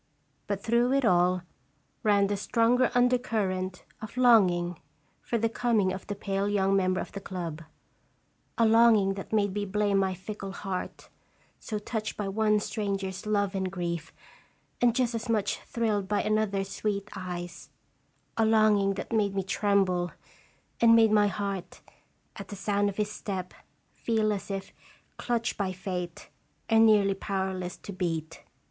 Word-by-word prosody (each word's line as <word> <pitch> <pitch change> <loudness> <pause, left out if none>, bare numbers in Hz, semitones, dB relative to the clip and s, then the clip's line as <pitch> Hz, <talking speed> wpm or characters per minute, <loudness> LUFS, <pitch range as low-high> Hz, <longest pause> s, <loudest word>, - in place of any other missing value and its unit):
But 200 0 -3
through 235 +3 +2
it 275 -2 +2
all 180 -2 +3 0.6
ran 205 -2 +3
the 205 +1 -1
stronger 235 +5 +2
under 245 0 +4
current 190 -6 -2 0.2
of 215 +3 -9
longing 180 -9 +4 0.4
for 235 - -1
the 230 0 +1
coming 220 -5 +1
of 190 - -8
the 205 - -3
pale 195 0 -1
young 195 -1 +2
member 185 -1 +2
of - - -5
the 200 - -7
club 170 -5 -5 1.0
a 230 - +4
longing 220 -3 +5
that 195 0 -8
made 205 -3 +1
me 205 0 -2
blame 205 0 +1
my 190 -1 0
fickle 195 +1 -7
heart, 190 -2 -5 0.5
so 215 - -4
touched 215 +1 -4
by 205 - -2
one 210 +1 +2
stranger's 195 -2 -3
love 205 -2 +1
and 190 -1 -2
grief, 170 -3 -4 0.7
and 240 -1 +4
just 250 -2 +1
as 230 +1 -4
much 215 -3 0
thrilled 215 -4 -1
by 205 0 0
another's 205 -2 0
sweet 205 -1 -2
eyes; 175 -2 -6 0.7
a 225 - +3
longing 215 -3 +3
that 215 - -6
made 205 -3 +1
me 195 - 0
tremble, 190 -3 +1 0.7
and 230 -1 +6
made 225 -1 +5
my 210 -1 +5
heart, 195 -2 -4 0.6
at 200 - -7
the 205 - -7
sound 205 0 0
of 195 - -8
his 210 -1 -1
step, 190 -4 -5 0.4
feel 220 -2 0
as 200 - -6
if 195 -1 -5 0.4
clutched 235 -2 -1
by 195 -2 -1
Fate, 180 -2 -5 0.4
and 225 0 +6
nearly 205 -2 +4
powerless 190 -2 -3
to 200 - -9
beat. 165 -3 -3
200 Hz, 155 wpm, -28 LUFS, 190-220 Hz, 1.0 s, and